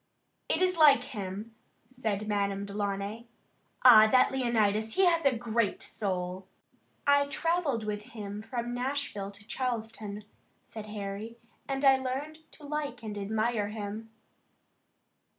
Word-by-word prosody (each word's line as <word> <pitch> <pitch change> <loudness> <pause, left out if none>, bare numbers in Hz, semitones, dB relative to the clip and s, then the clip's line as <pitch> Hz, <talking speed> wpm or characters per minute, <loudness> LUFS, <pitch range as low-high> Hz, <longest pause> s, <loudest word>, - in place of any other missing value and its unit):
"It - - +2
is 365 -1 +2
like 300 -3 +7
him," 205 0 -6 0.3
said 220 -5 -3
Madame 200 -1 0
Delaunay. 200 +2 -3 0.6
"Ah, 220 -3 +10
that 255 0 +5
Leonidas, 220 -4 +1
he 385 - +5
has 335 -3 +3
a 260 -4 +2
great 230 -2 0
soul!" 185 -2 -3 0.6
"I 285 0 +4
travelled 320 -6 0
with 210 -1 -3 0.2
him 205 0 -5
from 240 +1 -4
Nashville 250 -5 -3
to 200 0 -13
Charleston," 225 -4 -4 0.4
said 215 -1 -9
Harry, 210 +2 -6 0.3
"and 275 0 -1
I 270 -1 +7
learned 270 +4 -4
to 305 - -14
like 285 -5 -4
and 215 -2 -5
admire 215 +1 0
him." 215 +1 -6
225 Hz, 130 wpm, -30 LUFS, 205-265 Hz, 0.6 s, Ah